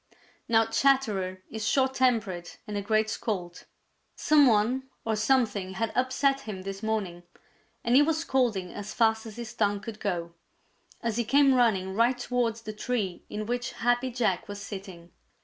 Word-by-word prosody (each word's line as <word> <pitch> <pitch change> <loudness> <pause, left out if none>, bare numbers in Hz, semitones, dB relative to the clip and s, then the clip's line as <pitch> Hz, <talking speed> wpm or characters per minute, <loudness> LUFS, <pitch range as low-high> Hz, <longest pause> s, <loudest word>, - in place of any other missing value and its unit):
Now 225 -1 +4
Chatterer 215 -7 +1
is 220 -1 -3
short 265 -1 +2
tempered 215 -10 0 0.2
and 210 -2 -6
a 205 - -1
great 215 +2 +1
scold. 180 -6 -4 0.5
Some 295 -2 +5
one 245 +4 +2 0.2
or 220 -1 +1
something 215 -5 +1
had 225 +2 -1
upset 265 +2 +1
him 210 -7 -7
this 195 0 -6
morning, 205 -6 -2 0.6
and 235 - +1
he 275 - +8
was 315 +1 +2
scolding 245 - 0
as 205 0 -7
fast 220 -1 +2
as 215 - -9
his 235 -2 -7
tongue 205 -1 +1
could 210 +1 -8
go, 170 -4 -3 0.7
as 230 -1 -2
he 240 - +2
came 275 +4 +4
running 205 -7 +2
right 235 +4 +3
towards 245 -2 -1
the 215 - -6
tree 210 -5 -3
in 215 0 -4
which 245 +2 -3
Happy 245 +2 +1
Jack 230 -7 -1
was 205 0 -6
sitting. 190 -4 -9
220 Hz, 165 wpm, -28 LUFS, 200-245 Hz, 0.7 s, he